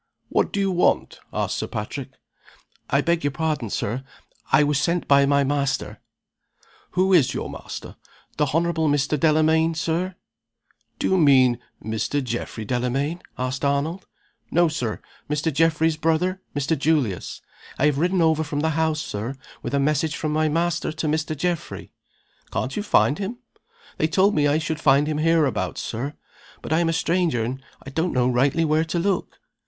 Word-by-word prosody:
"What - - +1
do - - -2
you 195 -1 +1
want?" 180 -1 +1
asked - - -1
Sir - - -3
Patrick - - -5 0.8
"I 140 - +3
beg 170 +1 0
your 145 - +2
pardon, 155 -5 -2
Sir; 120 +6 -2 0.5
I - - +6
was 145 -1 +1
sent 170 +3 0
by 140 -1 +5
my 140 0 +3
master 140 0 -1 0.5
" - - -32
"Who 190 +1 +3
is 155 -9 +4
your - - -4
master?" - - -8 0.4
"The 150 - +2
Honorable 165 -1 +1
Mr. 145 +1 +1
Delamayn, 160 +1 +3
Sir." 170 +3 -1 0.8
"Do - - 0
you 190 - +3
mean 130 -5 +5 0.3
Mr. 110 +6 -1
Geoffrey 120 -2 -4
Delamayn?" 130 - -1 0.2
asked 130 +2 -3
Arnold. 145 +6 -1 0.4
"No, 175 +1 +4
Sir. 125 -9 -3 0.3
Mr. 150 +1 0
Geoffrey's 160 +1 +2
brother 165 +4 0
Mr. 145 +3 +1
Julius. 145 - -1 0.3
I 140 - +2
have 145 -2 +2
ridden 180 +1 +2
over 160 -1 +3
from 145 -1 -3
the 160 - +1
house, 160 0 0
Sir, 110 +6 -4 0.3
with 120 +4 -3
a - - +2
message 150 +2 +1
from 155 - -2
my 155 0 +2
master 170 +1 0
to 160 - -4
Mr. 155 0 -1
Geoffrey." 175 +1 -3 0.6
"Can't 130 - -3
you - - -1
find 175 -7 +3
him?" 205 +4 -4 0.6
"They 155 - +3
told 190 +5 +3
me 145 -1 +3
I 145 +1 +3
should 160 0 -3
find 140 0 +4
him 150 0 -2
hereabouts, 160 -3 +1
Sir. 135 +7 -4 0.5
But - - -2
I'm 165 +1 +2
a - - +2
stranger, 165 -7 +1
and 130 +4 -4 0.3
don't 165 +2 0 0.2
rightly 140 +6 +2
know - - +1
where 155 +1 +2
to 165 +2 -2
look." 185 +1 -1
155 Hz, 170 wpm, -23 LUFS, 140-165 Hz, 0.8 s, I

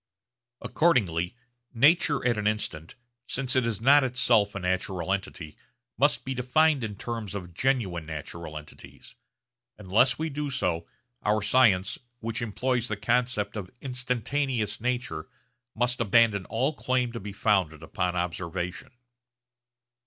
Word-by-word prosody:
Accordingly 115 - +1 0.4
nature 145 +2 +4
at 120 -2 +3
an 105 -1 -1
instant, 85 -7 -3 0.3
since 130 0 0
it 130 -2 +2
is 110 -4 -2
not 140 +5 +6
itself 120 -5 +2
a - - -2
natural 95 0 -1
entity, 85 -5 -5 0.4
must 145 +2 +2
be 130 - -2
defined 135 +3 +2
in 105 -2 -4
terms 110 -2 -5
of 90 -3 -6
genuine 95 - 0
natural 80 +1 -7
entities. 75 0 -13 0.6
Unless 110 +6 +2
we 160 0 -2
do 145 +1 -3
so, 90 -11 -1 0.3
our 105 0 +1
science, 100 -7 +3 0.2
which 115 0 -4
employs 120 +2 -1
the 110 - -3
concept 120 0 0
of 100 -4 -5
instantaneous 125 -3 0
nature, 125 -10 -2 0.5
must 125 +2 0
abandon 110 -2 +3
all 130 +7 0
claim 130 -3 0
to 115 - -6
be 100 +1 -7
founded 95 -6 +1
upon 90 +3 -2
observation. 90 +1 -3
110 Hz, 130 wpm, -27 LUFS, 95-125 Hz, 0.6 s, not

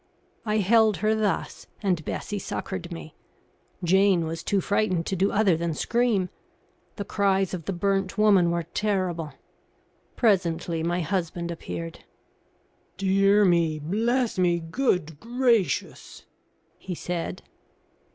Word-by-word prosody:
I 210 0 +1
held 215 0 +4
her 215 - +4
thus, 210 -5 -2 0.2
and 180 -5 +1
Bessie 205 +6 -4
succoured 185 -1 -5
me. 165 -2 -8 0.7
Jane 190 -1 +4
was 165 +1 -4
too 200 - 0
frightened 185 -3 0
to 195 - -2
do 190 +2 +1
other 200 -4 +3
than 165 -1 -2
scream. 225 -2 +1 0.7
The 200 - -5
cries 195 -2 +1
of 170 -4 -5
the - - -2
burnt 195 +1 -1
woman 200 -5 +5
were 170 0 -1
terrible. 180 -4 -2 0.8
Presently 175 -6 +1
my 175 +2 0
husband 170 0 -2
appeared. 85 - -7 0.9
"Dear 195 +2 +4
me! 170 -3 +2
Bless 225 - 0
me! 175 -1 +3
Good 165 - -1
gracious!" 235 -3 0 0.5
he 185 -2 -5
said. 175 +1 -4
185 Hz, 120 wpm, -26 LUFS, 170-205 Hz, 0.9 s, woman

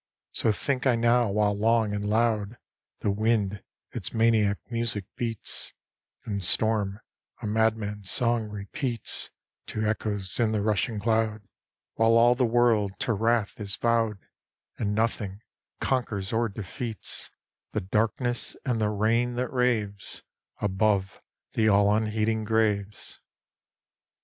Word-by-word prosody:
So 110 - +1
think 130 +5 -1
I 125 - +4
now 120 0 +3
while, 105 0 +2
long 110 0 +2
and 105 0 -2
loud, 110 0 +1 0.4
The 105 - +1
wind 105 -2 0 0.3
its - - -5
maniac 110 -3 +3
music 115 -4 -2
beats, 115 -3 -3 0.5
And 100 -3 -3
storm 105 +1 +2 0.4
a 120 - -6
madman's 105 -2 0
song 115 -3 +2
repeats 105 +4 -3 0.4
To 110 0 -2
echoes 105 -2 0
in 110 -2 +2
the 105 -2 0
rushing 105 +1 0
cloud; 110 0 0 0.5
While 115 0 +3
all 120 +1 +6
the 125 -1 +1
world 115 -4 +3
to 115 - +1
wrath 115 0 0
is 100 0 -3
vowed, 115 -3 +1 0.6
And 105 -2 -1
nothing 105 -3 -1 0.4
conquers 110 -7 -1
or 115 0 +1
defeats 110 +3 -4 0.4
The - - 0
darkness 115 +5 0
and 120 -4 0
the 105 - +2
rain 115 +4 +1
that 125 +1 -2
raves 110 -6 -1 0.4
Above 100 -1 0 0.3
the 110 -1 +2
all 100 0 +4
unheeding 110 0 0
graves. 105 -2 -1
110 Hz, 125 wpm, -27 LUFS, 105-115 Hz, 0.6 s, all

